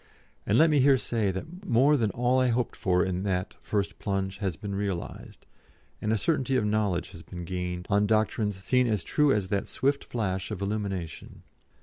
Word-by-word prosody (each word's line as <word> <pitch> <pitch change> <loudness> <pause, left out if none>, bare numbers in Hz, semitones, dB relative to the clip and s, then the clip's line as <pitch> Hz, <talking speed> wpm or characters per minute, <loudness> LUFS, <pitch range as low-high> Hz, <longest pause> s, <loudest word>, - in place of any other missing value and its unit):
And 105 - +3
let 160 +1 +6
me 150 - +4
here 135 0 +6
say 115 -4 0
that 160 - -6
more 145 - +4
than 115 -6 +1
all 125 +5 +1
I 130 - +3
hoped 120 0 0
for 90 0 +2
in 90 -1 -2
that 95 -1 -1
first 100 -2 -2
plunge 95 -1 -2
has 95 -6 -1
been 100 +4 -6
realised, 100 -3 -5 0.6
and 105 - 0
a 110 - +3
certainty 135 0 +1
of 110 - +1
knowledge 105 -5 0
has 80 - -10
been 90 +1 -8
gained 90 0 -4
on 100 +1 +2
doctrines 110 -1 +1
seen 125 +7 +1
as 105 -6 0
true 150 -2 +2
as 100 -6 0
that 100 0 -1
swift 140 +1 0
flash 95 -5 -2
of 105 -4 -4
illumination. 100 -5 -4
105 Hz, 195 wpm, -28 LUFS, 95-125 Hz, 0.6 s, let